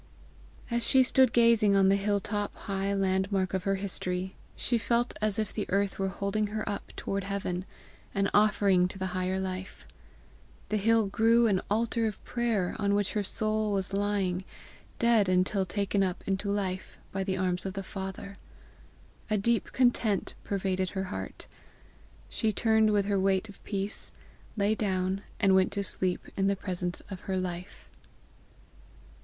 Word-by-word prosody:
As 235 0 +1
she 260 -1 +6
stood 260 -1 +4
gazing 230 -4 +5
on 195 -1 +5
the 195 - +5
hill 200 0 +1
top, 205 +1 -3
high 195 0 -2
landmark 190 -1 0
of 190 -1 -1
her 195 0 +2
history, 190 -1 -2 0.2
she 240 -1 0
felt 235 +1 0
as 215 -1 +1
if 215 -2 -2
the 210 - -3
earth 200 0 0
were 195 - +1
holding 200 +2 -1
her 215 +1 -4
up 205 0 -4
toward 195 0 -3
heaven, 190 -2 -3 0.5
an 195 0 +2
offering 200 -3 +4
to 190 - -8
the 190 - -2
higher 185 +1 -1
life. 185 0 -5 0.8
The 215 - +1
hill 225 +1 +3
grew 230 +3 +4
an 195 -4 +2
altar 225 +2 +1
of 210 - -6
prayer 230 -7 -1
on 200 -1 +2
which 205 -1 0
her 210 - +1
soul 215 +1 0
was 195 -1 -1
lying, 195 -2 0 0.5
dead 230 -5 +4
until 185 +1 +2
taken 200 +1 0
up 185 -2 -1
into 195 +1 -1
life 190 -2 -2
by 195 0 -2
the 190 -1 -1
arms 180 -1 0
of 190 - -4
the 195 0 -4
Father. 190 +1 -7 0.9
A 215 - +2
deep 230 +3 +1
content 240 -6 +1
pervaded 190 -2 -1
her 190 -1 -3
heart. 95 0 -6 0.8
She 220 - 0
turned 220 0 +3
with 205 -1 +2
her 200 -1 +1
weight 190 +2 +1
of 200 - -14
peace, 200 0 -3 0.5
lay 205 +1 +3
down, 190 -2 -1 0.2
and 195 -1 +4
went 190 0 +4
to 200 - -1
sleep 185 -1 -1
in 195 0 +1
the 200 - +2
presence 180 -2 -3
of 190 - -5
her 190 - +1
Life. 180 +1 -5
200 Hz, 165 wpm, -29 LUFS, 190-215 Hz, 0.9 s, she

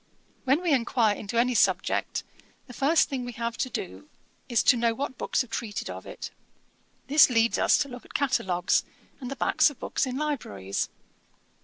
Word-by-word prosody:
When 275 +7 +2
we 335 -4 +2
enquire 235 -4 +2
into 210 +3 -5
any 250 +1 +2
subject, 230 - +1 0.4
the 250 - -12
first 290 +6 +3
thing 265 -3 -4
we 245 0 -6
have 235 0 -3
to 255 - 0
do 275 +7 -6 0.4
is 235 -3 +2
to 255 - +6
know 230 -1 +1
what 265 0 -4
books - - 0
have 240 - -16
treated 220 -3 -4
of - - -9
it. - - -7 0.7
This 295 0 +6
leads 230 -1 +2
us - - +4
to 295 - 0
look 245 -3 -9
at - - -17
catalogues, 190 -11 +1 0.4
and 255 -3 -6
the 275 - -4
backs 275 - +3
of 290 - -13
books - - -1
in 255 0 -3
libraries.' 160 - -3
250 Hz, 185 wpm, -27 LUFS, 230-275 Hz, 0.7 s, to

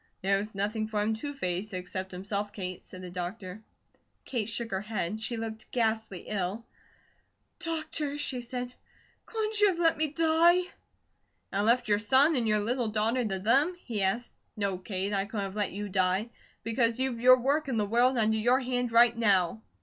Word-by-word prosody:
"There 195 +1 +2
was 210 +1 -6
nothing 210 +2 -1
for 215 -1 -2
him 220 +1 +1
to 285 +6 -5
face, 195 -5 -3
except 185 +1 -5
himself, 200 +2 -3
Kate," 185 -3 -5
said 185 0 -11
the 180 - -7
doctor. 185 +3 -6 0.6
Kate 230 -4 -2
shook 225 0 -4
her 190 0 -1
head. 210 -1 -3
She 235 +1 -2
looked 220 -1 -5
ghastly 220 -5 -1
ill. 205 +2 -3 0.9
"Doctor," 315 -4 -3
she 260 -4 -1
said, 245 +1 -5 0.5
"couldn't 435 -1 -2
you 415 - +7
have 370 -4 0
let 330 -1 +3
me 310 - +2
die?" 330 +4 +4 0.9
"And 200 +2 0
left 240 0 +3
your 205 -1 +3
son 265 +9 +5
and 240 -4 +1
your 215 -1 +2
little 240 +2 -1
daughter 225 +4 +1
to 205 -4 -2
them?" 270 - +3
he 235 - -4
asked. 210 +6 -1 0.2
"No, 200 -3 -1
Kate, 190 +1 -3
I 195 -1 +1
couldn't 205 -1 -3
have 195 0 -7
let 205 -2 -1
you 205 +2 -5
die; 190 +3 +1 0.3
because 230 0 +1
you've 260 -2 -1
your 255 +1 +7
work 285 +4 +1
in 255 -4 -1
the 210 - +1
world 245 +4 +3
under 220 -1 +2
your 245 +4 +3
hand 245 -1 -1
right 235 0 +6
now." 190 - +2
220 Hz, 190 wpm, -29 LUFS, 200-255 Hz, 0.9 s, you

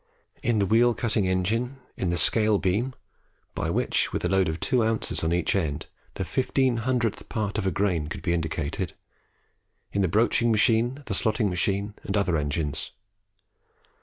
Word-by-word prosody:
in 120 -1 +1
the 100 - +3
wheel 115 +3 +4
cutting 110 -4 +1
engine, 110 +8 0 0.2
in 90 - -1
the 85 - 0
scale 105 +5 +3
beam 105 +8 0 0.6
(by - - -2
which, - - +1
with - - -2
a - - +3
load 95 -3 +2
of 80 +1 -3
2 125 -4 +2
oz. 110 -5 -1
on 80 - +1
each 85 +2 +1
end, 80 -7 -1 0.3
the 95 - -3
fifteen 130 - +1
hundredth 120 -2 -1
part 105 -1 -2
of 95 - -1
a - - +2
grain 90 -5 0
could 80 - -7
be 85 -3 +1
indicated), 80 +1 -2 1.0
in 100 - +1
the 95 - +3
broaching 115 +5 +2
machine, 115 +5 +2
the 105 - -3
slotting 110 +1 +1
machine, 100 +3 0
and 100 - -2
other 100 -4 +1
engines. 75 -1 -2
100 Hz, 170 wpm, -26 LUFS, 90-115 Hz, 1.0 s, wheel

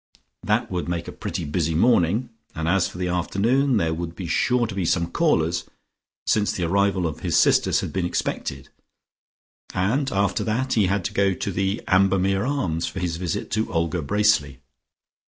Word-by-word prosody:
That - - 0
would 90 -1 -3
make 85 -1 -3
a - - -5
pretty - - -5
busy 80 +1 -1
morning, 115 +3 +2 0.2
and 80 0 -2
as 90 0 +2
for - - -11
the 90 0 -2
afternoon, 115 +9 +1
there 80 -5 +1
would 85 +1 -5
be 95 - -6
sure 125 +8 +1
to 110 - -5
be 95 -1 -2
some 85 0 0
callers, 85 - +1 0.6
since 105 -1 +2
the 90 - -3
arrival 95 +1 +1
of 80 -3 -3
his - - 0
sisters - - +3
had - - -5
been 95 -2 0
expected, 70 -5 -3 1.1
and 125 +10 0
after 100 +1 0
that 130 +4 -1
he 105 -4 +3
had 95 -1 -1
to - - -3
go 100 -1 +2
to 100 - -3
the 95 +2 -1
Ambermere 95 0 +3
Arms 90 - -1
for - - -5
his 85 -2 -2
visit 90 0 -3
to 110 +2 -1
Olga 85 0 0
Bracely.... 75 -6 +1
95 Hz, 180 wpm, -23 LUFS, 85-105 Hz, 1.1 s, sisters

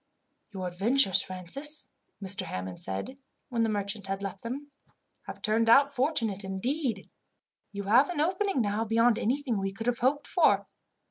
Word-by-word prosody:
"Your 190 -3 -4
adventures, 195 +4 +3
Francis," 190 - 0 0.4
Mr. 195 +1 +2
Hammond 90 0 -6
said 95 - -4 0.3
when 235 -3 -1
the 225 - +2
merchant 205 -1 -3
had 195 +1 -3
left 195 -1 -5
them, 280 +5 -6 0.6
"have - - -9
turned 225 +1 +2
out 280 +4 +6
fortunate, 240 -8 0
indeed. 225 +4 -2 0.6
You 200 -1 -5
have 235 - +4
an 350 -4 -3
opening 370 -1 +1
now 210 +1 0
beyond 230 +1 +3
anything 250 -1 -1
we 195 0 -2
could 225 +3 -7
have 245 -1 0
hoped 280 +4 +1
for. - - +3
225 Hz, 155 wpm, -28 LUFS, 195-270 Hz, 0.6 s, out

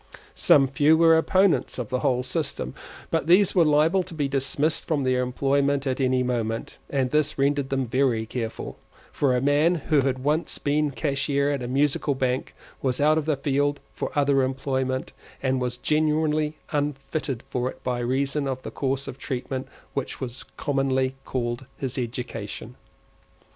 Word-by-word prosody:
Some 135 -2 +5
few 145 +4 +4
were 165 0 +6
opponents 165 -3 +2
of 125 -2 -4
the 130 0 0
whole 125 -3 +1
system; 130 - -3 0.4
but 160 -1 0
these 185 +3 +5
were 180 - +5
liable 155 +5 +4
to 180 -2 -8
be 145 -3 0
dismissed 140 +3 0
from 150 -4 +1
their 130 -1 +2
employment 140 +2 +1
at 130 0 -1
any 130 -1 +2
moment, 115 -3 -2
and 130 -3 0
this 150 0 +1
rendered 140 0 +1
them 135 -1 0
very 120 -2 +1
careful, 115 0 -5 0.3
for 135 -3 +1
a 125 - +1
man 145 +5 +3
who 155 -1 +1
had 130 -1 -1
once 150 +3 0
been 150 +1 +1
cashier 140 0 0
at 140 -2 -2
a 120 - -3
Musical 140 +2 +1
Bank 130 0 -1 0.3
was 130 -2 0
out 155 +2 +4
of 150 - -4
the 155 -3 +1
field 145 +1 0
for - - -4
other 140 -1 +3
employment, 130 0 -1 0.3
and 130 -1 +1
was 125 -1 -2
generally 155 +1 +1
unfitted 145 -3 -2
for 125 0 0
it - - -12
by 125 -1 -1
reason 135 +4 0
of 130 -1 -3
that - - -7
course 135 0 -1
of 130 - -7
treatment 130 0 -4 0.3
which - - -3
was 130 0 -6
commonly 135 -2 0
called 120 0 -3
his 135 -1 -3
education. 120 -2 -5
135 Hz, 170 wpm, -25 LUFS, 130-150 Hz, 0.4 s, were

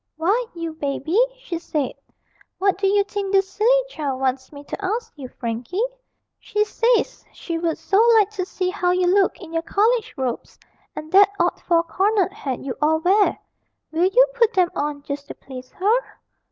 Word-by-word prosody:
'Why, 410 +10 +1
you 335 -1 -4
baby,' 315 - 0
she 435 -10 -5
said, 300 -6 -2 0.6
'what 390 0 +2
do 395 - +2
you 405 +1 +3
think 400 -1 -4
this 390 -1 +3
silly 470 +6 +2
child 285 - -4
wants 260 0 -1
me 285 -1 -11
to 395 - -7
ask 440 +5 -2
you, 275 -4 -8
Frankie? 240 - -5 0.6
She 420 0 0
says 465 +3 +1
she 335 -2 -5
would 330 -1 -1
so 395 +2 +2 0.2
like 420 -1 +3
to 395 -3 -3
see 365 0 -2
how 360 -1 0
you 360 0 +2
look 385 +2 +2
in 330 -4 -11
your 330 - 0
college 440 +6 +1
robes 255 -3 -4 0.4
and 310 +1 -7
that 395 +1 +7
odd 345 +1 +1
four 335 -1 +2
cornered 385 +3 +1
hat 275 - -4
you 270 -2 -4
all 310 +1 +3
wear. 395 +4 +3 0.5
Will 330 +3 +2
you - - +6
put 470 -2 +2
them 365 -2 +2
on, 290 -1 -3
just 280 0 -6
to - - -8
please 255 -1 -10
her?' 425 +6 +2
365 Hz, 185 wpm, -22 LUFS, 300-410 Hz, 0.6 s, that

